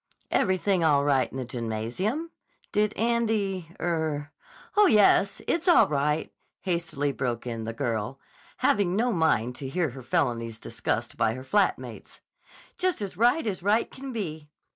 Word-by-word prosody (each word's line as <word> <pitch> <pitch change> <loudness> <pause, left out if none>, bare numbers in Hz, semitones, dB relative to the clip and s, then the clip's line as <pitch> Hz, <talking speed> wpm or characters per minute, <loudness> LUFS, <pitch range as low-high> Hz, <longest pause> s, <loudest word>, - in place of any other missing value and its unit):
"Everything 190 -1 +2
all 145 -3 +4
right 135 -3 +2
in - - -8
the 130 - -3
gymnasium? 125 - -3 0.4
Did 210 0 +2
Andy—er—" 180 -9 -1 0.4
"Oh, 415 -1 +6
yes. 200 - +4
It's 335 +1 0
all 350 - +7
right," 150 +1 0 0.3
hastily 170 -6 -1
broke 125 -4 -3
in 115 -2 -4
the 115 - -3
girl, 115 0 -2 0.4
having 190 -3 +2
no 235 +3 +1
mind 125 - +1
to 135 - -5
hear 165 -1 0
her 130 +2 -9
felonies 115 -2 -1
discussed 115 0 -3
by 115 -1 +1
her 130 - -7
flat 200 +9 +2
mates. - - -11 0.6
"Just 370 -1 +1
as 200 -3 -5
right 240 - +3
as 195 -5 -2
right 210 +5 +2
can 270 0 -7
be." 160 -10 -5
160 Hz, 150 wpm, -27 LUFS, 130-210 Hz, 0.6 s, all